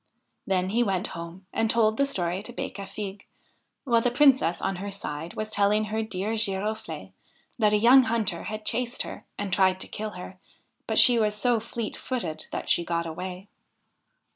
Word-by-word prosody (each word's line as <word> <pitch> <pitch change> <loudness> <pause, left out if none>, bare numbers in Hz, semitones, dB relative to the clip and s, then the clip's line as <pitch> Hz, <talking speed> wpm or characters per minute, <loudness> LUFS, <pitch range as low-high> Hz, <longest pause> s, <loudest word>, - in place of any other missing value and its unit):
Then 185 -1 +1
he 230 +4 +2
went 195 -5 0
home 170 +3 -8
and 225 0 +1
told 220 -1 +3
the 280 - +3
story 180 -6 -1
to 230 - -9
Becafigue, 200 -3 -6 0.6
while 235 -4 +3
the 245 - +2
Princess 255 - +4
on 195 -1 -2
her 200 +2 -5
side 165 -4 -5
was 215 0 -4
telling 210 0 +3
her 215 +1 -2
dear 215 0 -3
Giroflee 215 0 -1 0.5
that 210 -2 +4
a - - +5
young 245 +5 +7
hunter 220 -7 -1
had 215 0 -5
chased 250 +1 0
her - - -9
and 200 -2 -3
tried 190 -1 +3
to - - -6
kill 215 0 -5
her, 185 +1 -9 0.5
but - - 0
she 245 -2 +7
was 210 -1 +1
so 240 +2 +2
fleet 225 0 -5
footed 170 -12 -4
that - - -5
she 170 - +3
got 170 0 -1
away. 180 +4 -6
210 Hz, 180 wpm, -27 LUFS, 185-225 Hz, 0.6 s, young